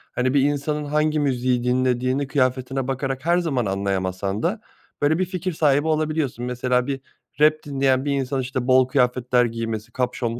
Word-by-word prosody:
Hani, 130 +2 +1
bir 140 - +4
insanın 145 +1 -1
hangi 150 +1 +1
müziği 125 -3 0
dinlediğini 130 +2 +1
kıyafetine 130 -1 0
bakarak 135 +1 -3
her 175 +1 +3
zaman 140 -10 0
anlayamasan 95 - -2
da 210 +6 -1 0.4
böyle 155 +3 +3
bir 185 - +2
fikir 185 -1 -4
sahibi 145 0 +2
olabiliyorsun. 155 -6 -1
Mesela 125 +1 0
bir 135 -1 -3 0.4
rap 155 0 +6
dinleyen 135 -1 +1
bir 145 - 0
insan, 135 -1 -1
işte, 130 0 -3
bol 130 0 +5
kıyafetler 125 -1 +2
giymesi, 115 -1 -4
kapüşonlu 120 -1 -2
130 Hz, 160 wpm, -23 LUFS, 125-145 Hz, 0.4 s, rap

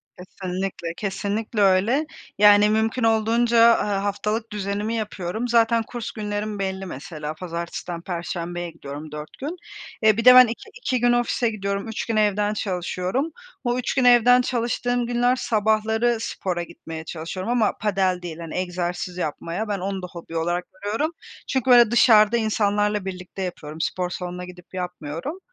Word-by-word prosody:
Kesinlikle 185 -2 -5
kesinlikle 210 +2 -2
öyle. 200 +10 +3 0.3
Yani, 205 0 +7
mümkün 220 +3 +1
olduğunca, 230 +1 +3 0.2
aaa, 200 -1 -1
haftalık 210 +3 -2
düzenimi 205 +2 -2
yapıyorum. 215 0 -3
Zaten 230 -1 +3
kurs 235 0 -6
günlerim 210 -1 -4
belli 190 0 -3
mesela. 155 -1 -6
Pazartesi'den 170 0 -5
Perşembe'ye 175 0 -4
gidiyorum 150 -1 -9
4 150 0 -8
gün. 305 +7 -4 0.5
Eee, 215 0 +5
bir 230 - -1
de 250 0 +10
ben 255 0 +10
2 230 - -7
2 255 -1 0
gün 245 0 +3
ofise 240 -1 +1
gidiyorum. 200 0 -3
3 225 - -4
gün 225 - -2
evden 210 0 +2
çalışıyorum. 190 - -2 0.3
O 245 -1 0
3 250 - -1
gün 255 -2 +2
evden 245 +1 +6
çalıştığım 245 0 -1
günler 245 +1 +2
sabahları 220 +1 +1
spora 180 -5 -3
gitmeye 165 -1 -9
çalışıyorum. 175 +6 -5
Ama 235 -3 +1
padel 190 -3 +1
değil 170 -2 -6
hani 165 -2 -7
egzersiz 180 0 -3
yapmaya. 170 +5 -3
Ben 205 -1 -2
onu 190 +1 -3
da 180 - -6
hobi 165 -1 -7
olarak 175 +2 -1 0.2
görüyorum. 225 +11 -1 0.4
Çünkü 260 -2 -1
böyle 240 -2 +7
dışarıda 230 -2 +6
insanlarla 210 -2 +1
birlikte 185 0 -7
yapıyorum, 160 -4 -5
spor 180 +1 -1
salonuna 180 0 -5
gidip 180 0 -14
yapmıyorum. 180 - -5
205 Hz, 155 wpm, -23 LUFS, 180-230 Hz, 0.5 s, de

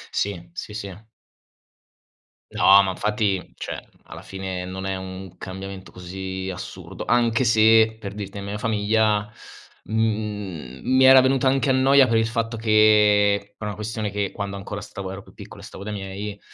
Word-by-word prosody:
Sì, 90 -4 -2
sì, 105 - -7
sì. 100 -4 -6 1.6
No 100 +1 +6
ma 95 - -1
infatti, 105 -1 -1
cioè - - -7 0.2
alla - - -10
fine 95 -1 -5
non 95 +1 -6
è 95 0 -2
un 95 -1 -8
cambiamento 95 0 -8
così 95 +1 -6
assurdo, - - -8
anche 120 0 +2
se, 110 0 +5
per 100 -2 -7
dirti, 100 -1 -7
nella 100 0 -6
mia 105 - -3
famiglia, 105 -1 +1 0.5
mhmm, 105 - -3
mi 130 +1 +3
era 130 0 +9
venuta 130 0 +2
anche 135 +1 +2
a - - +3
noia 135 +1 +5
per 115 - +2
il 110 0 +2
fatto 115 0 -2
che 105 -2 +4
per 110 - -7
una 105 - -4
questione 110 -1 -4
che 100 -1 -1
quando 100 -1 -5
ancora 100 +1 -6
stavo 95 -1 -7
ero 95 +1 -7
più - - -18
piccolo - - -12
e - - -10
stavo 100 - -10
dai 105 - -5
miei, 100 +1 -6
105 Hz, 170 wpm, -23 LUFS, 95-110 Hz, 1.6 s, era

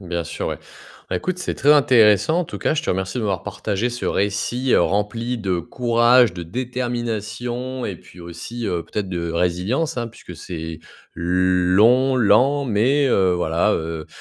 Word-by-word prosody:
Bien 85 -2 -4
sûr, - - -4
ouais. - - -4 0.5
Bah - - -1
écoute, 180 - -3
c'est 180 - -3
très 145 +2 +4
intéressant 130 - +4
en - - -2
tout - - -8
cas - - 0
je 155 - -1
te - - -2
remercie 95 +6 -2
de - - -2
m'avoir 95 -5 -1
partagé 105 +3 -2
ce 120 0 -6
récit, 105 +6 -1
heu, - - +5
rempli 115 +6 -1
de 95 -5 -1
courage, 120 +3 +3
de 90 - -6
détermination 120 +3 -4
et 100 - -4
puis 85 - -18
aussi, 85 +8 -7
heu, 90 -4 -2
peut-être 100 +1 -4
de 85 -2 -3
résilience, 90 - -1
hein. 120 -1 -2
Puisque 100 -5 -12
c'est 80 -1 -7 0.4
l - - -6 0.5
long, 125 +6 +4
lent 130 +5 +3
mais 130 +5 +2
heu, 95 -7 +3
voilà, 90 0 +1
heu, 80 -1 -4
110 Hz, 175 wpm, -21 LUFS, 90-125 Hz, 0.5 s, heu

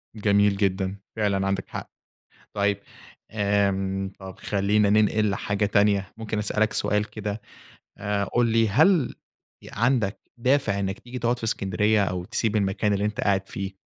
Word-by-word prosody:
جميل 100 -1 +3
جدًا، 95 -1 0 0.2
فعلًا 100 -3 0
عندك 95 0 -2
حق. - - -6 0.7
طيب، 100 -1 +1 0.5
امم، 100 -2 0
طَب 95 -1 -10
خلّينا 100 +1 +1
ننقِل 105 0 +3
حاجة 100 +1 -1
تانية. 100 -2 +2
ممكن 110 -1 -4
أسألك 105 +1 0
سؤال 105 +1 0
كده 105 0 -4 0.6
آآ، 100 0 -1
قُل 120 +5 +1
لي، 115 -1 +3
هل 155 - +3 0.5
إ - - -10
عندك 115 -3 +1 0.2
دافِع 125 -5 +2
إنك 95 0 -2
تيجي 125 +1 -8
تقعُد 120 +1 0
في 115 - -6
إسكندرية 105 0 +1
أو 90 -2 -3
تسيب 110 +3 -1
المكان 100 +1 +1
اللي 100 0 0
أنت 105 -1 -2
قاعد 95 -1 +1
فيه 95 0 -5
105 Hz, 150 wpm, -25 LUFS, 100-110 Hz, 0.7 s, جميل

